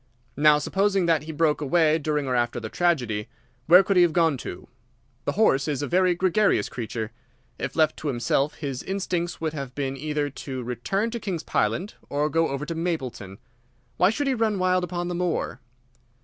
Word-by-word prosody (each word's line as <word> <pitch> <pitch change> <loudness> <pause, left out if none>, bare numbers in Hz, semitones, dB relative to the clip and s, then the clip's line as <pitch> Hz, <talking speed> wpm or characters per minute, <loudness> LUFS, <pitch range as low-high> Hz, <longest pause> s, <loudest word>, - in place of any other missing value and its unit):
Now, 150 +1 +5
supposing 195 +4 +1
that 160 -3 +2
he 160 - -5
broke 155 -1 +1
away 160 +2 +3
during 150 -1 -1
or 130 -1 -1
after 120 0 0
the 110 -1 -6
tragedy, 125 -13 0 0.4
where 180 +3 +8
could 195 0 +1
he - - +7
have 175 -2 +4
gone 165 -4 +3
to? - - -8 0.6
The - - 0
horse 170 -10 +3
is 145 -2 -1
a - - -2
very 180 0 +3
gregarious 185 - +2
creature. 110 -2 -5 0.5
If 135 - -4
left 155 -1 +2
to 155 - -5
himself 135 +2 0
his 135 -4 -4
instincts 180 -3 -2
would 160 -1 -2
have 135 -4 -6
been 135 -2 -2
either 150 +1 -2
to 130 -2 -6
return 195 - -2
to 235 - -4
King's 180 -7 -4
Pyland 195 +4 -1 0.2
or 145 +1 0
go 165 0 +2
over 140 +2 -3
to 165 - -4
Mapleton. 135 - -4 0.6
Why 180 - +5
should 255 +7 -1
he 270 - +2
run 220 -4 +1
wild 185 0 +2
upon 175 -1 -3
the 175 - -3
moor? 175 -5 -2
160 Hz, 190 wpm, -25 LUFS, 135-180 Hz, 0.6 s, where